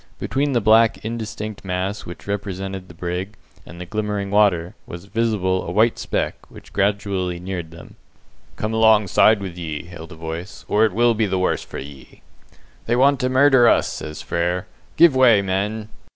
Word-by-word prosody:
Between 140 +1 -1
the 120 - +2
black 110 +1 +4
indistinct 110 -2 -5
mass 95 +2 -3
which 85 - -10
represented 95 -2 -4
the 85 - -14
brig, 90 +4 -4 0.3
and 85 +2 -11
the 90 - -6
glimmering 105 0 -3
water, 95 -5 +2
was 85 +2 -9
visible 100 -4 0
a - - -6
white 110 +5 +2
speck, - - -3
which - - -15
gradually 100 -3 -1
neared 90 -2 -5
them. 85 0 -14 0.6
"Come 110 +1 -3
alongside 110 -1 +4
with 95 -3 -6
ye!" 80 -3 -5
hailed 85 -1 -11
a - - -9
voice, 80 +4 -7
"or 105 +2 +3
it 110 - -1
will 120 +3 +3
be 110 -1 0
the 95 -1 -1
worse 90 - 0
for - - -9
ye!" 70 -1 -11 0.6
"They 120 - +2
want 135 +2 +4
to 125 - 0
murder 130 -2 +5
us," - - +3
says 75 - -7
Frere. 90 +1 -1 0.3
"Give 170 -5 +6
way, 120 -6 +5
men!" 100 +3 -2
100 Hz, 175 wpm, -21 LUFS, 90-110 Hz, 0.6 s, Give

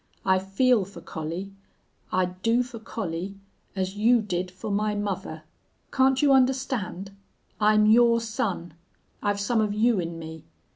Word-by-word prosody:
I 190 0 +4
feel 205 +4 +2
for 195 -1 -11
Collie 170 +4 -6 0.6
I'd 180 0 -1
do 230 +3 +2
for 240 -2 -9
Collie 195 -3 -5 0.4
as 190 0 -2
you 235 +3 +4
did 185 -4 -2
for 185 +3 -6
my 210 +1 0
mother! 205 -2 -4 0.5
Can't 265 +1 +3
you 280 -2 +5
understand? 255 -8 0 0.5
I'm 215 0 +4
your 230 +2 +5
son. 200 -7 -3 0.5
I've 205 -1 0
some 220 +3 +1
of 210 -1 -1
you 225 -1 +3
in 170 -1 -4
me. 160 -1 -9
205 Hz, 145 wpm, -26 LUFS, 185-230 Hz, 0.6 s, you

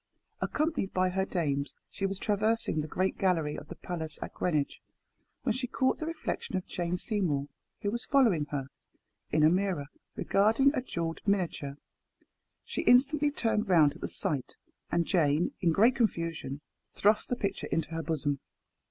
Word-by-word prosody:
Accompanied 305 -10 -1
by 185 0 +3
her 190 +1 0
dames, 145 -7 -1 0.2
she 195 - -1
was 195 0 -3
traversing 210 -4 +1
the 150 - -5
great 185 +4 -1
gallery 165 -6 +1
of 150 - -8
the - - -8
palace 160 -4 -5
at - - -6
Greenwich, 155 -5 -1 0.6
when - - +2
she 255 -1 -3
caught 260 +1 +1
the 315 - -3
reflection 320 - -3
of 185 - -4
Jane 175 0 -2
Seymour, 170 -10 -1 0.3
who 205 - +1
was 235 +2 -2
following 225 - +4
her, 140 -2 -4 0.6
in 155 0 +2
a 155 - +8
mirror, 180 -6 0 0.3
regarding 225 +8 +3
a 260 - 0
jewelled 165 -9 -3
miniature. 170 -8 0 0.9
She - - -2
instantly 280 +4 +5
turned 225 -7 0
round 155 -5 +6
at 165 - -14
the - - -3
sight, 140 -5 -2 0.3
and 170 -1 +2
Jane, 160 -2 +2
in 170 - +3
great 225 +9 +5
confusion, 165 - -1 0.3
thrust 210 +2 +3
the 245 - +1
picture 200 -4 -2
into 165 0 -1
her 165 0 -2
bosom. 145 -4 -1
180 Hz, 165 wpm, -30 LUFS, 155-220 Hz, 0.9 s, a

